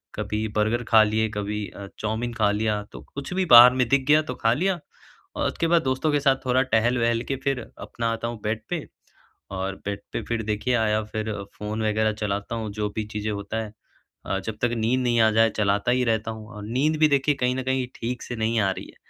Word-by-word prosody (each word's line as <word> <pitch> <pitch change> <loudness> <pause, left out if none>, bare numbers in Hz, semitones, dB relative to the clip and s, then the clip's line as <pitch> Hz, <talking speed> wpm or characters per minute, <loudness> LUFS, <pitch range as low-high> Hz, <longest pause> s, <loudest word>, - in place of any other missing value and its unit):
कभी 110 +1 -2
बर्गर 110 +3 +1
खा 110 -1 +7
लिए, 110 +1 +1
कभी 105 0 -3
अ, 100 - -9
चाउमीन 110 +2 -2
खा 105 -3 +2
लिया 105 0 0
तो - - -10
कुछ 140 +4 -5
भी 190 0 +1
बाहर 120 +1 +10
में 130 -2 +1
दिख 135 0 +2
गया 150 +1 +6
तो - - -5
खा 115 0 +4
लिया 180 +6 0 0.6
और - - 0
उसके 165 - -1
बाद 170 0 +3
दोस्तों 130 +4 0
के 145 - +2
साथ 135 -1 +3
थोड़ा 130 0 +3
टहल-वहल 115 -1 +1
के - - +1
फिर 135 -2 0 0.2
अपना 115 -1 -3
आता 115 +1 -3
हूँ 120 -1 -5
बेड 110 +1 -1
पे - - -3 0.7
और 95 +1 -3
बेड 100 0 -3
पे - - -2
फिर 115 -1 -1
देखिए 110 +4 0
आया 110 -2 +2
फिर 110 0 -4 0.3
फ़ोन 105 +1 -4
वग़ैरहचलाता 105 -1 -1
हूँ, 110 -2 -4
जो 105 0 -2
भी 110 - -1
चीज़ें 105 0 -3
होता 100 +1 -4
है। 105 -1 -10 0.5
अ, 95 - -1
जब 110 - -4
तक 120 - +2
नींद 115 +3 +1
नहीं 120 -2 +2
आ 110 - +5
जाए 115 +1 +4
चलाता 100 +2 +1
ही 125 0 +2
रहता 110 -1 0
हूँ 110 -1 -9
और 105 - -8
नींद 135 +8 +1
भी 155 - +6
देखिए 140 +1 +2
कहीं 125 -1 0
न 130 - -2
कहीं 130 0 0
ठीक 125 +1 -4
से 120 - -5
नहीं 115 0 0
आ 100 - +2
रही - - -6
है। - - -16
115 Hz, 230 wpm, -24 LUFS, 105-125 Hz, 0.7 s, बाहर